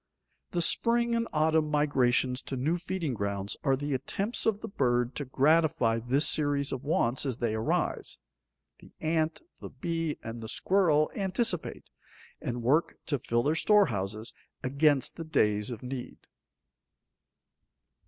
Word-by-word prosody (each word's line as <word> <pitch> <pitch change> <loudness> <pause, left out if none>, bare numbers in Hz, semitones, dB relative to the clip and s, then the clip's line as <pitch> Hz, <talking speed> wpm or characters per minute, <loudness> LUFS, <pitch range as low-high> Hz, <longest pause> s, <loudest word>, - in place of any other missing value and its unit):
The 175 -1 0
spring 235 +5 +2
and 230 0 0
autumn 155 0 +2
migrations 130 -4 +2
to 135 - -2
new 155 +7 0
feeding 170 -5 -3
grounds 100 -2 -3
are 135 -2 +3
the 145 +1 -3
attempts 195 - -2
of 210 -2 +1
the - - -5
bird 125 -7 0
to 145 - -4
gratify 135 -4 +2
this 130 +6 +2
series 145 -2 +2
of 130 - -4
wants 135 -4 +1
as 130 -5 -2
they 120 -3 -1
arise. 110 +1 -1 0.6
The - - -17
ant, 160 - -1 0.2
the - - -8
bee, 165 +3 -3
and 115 +1 -6
the 110 - -6
squirrel 160 - +2
anticipate, 195 -1 -2 0.5
and 120 -1 -4
work 145 +8 +2
to 145 -3 -1
fill 120 0 0
their 150 - +2
storehouses 115 - +1 0.3
against 140 0 +2
the 165 - -4
days 105 -9 +1
of 120 -1 -7
need. 125 0 -6
145 Hz, 145 wpm, -29 LUFS, 120-165 Hz, 0.6 s, are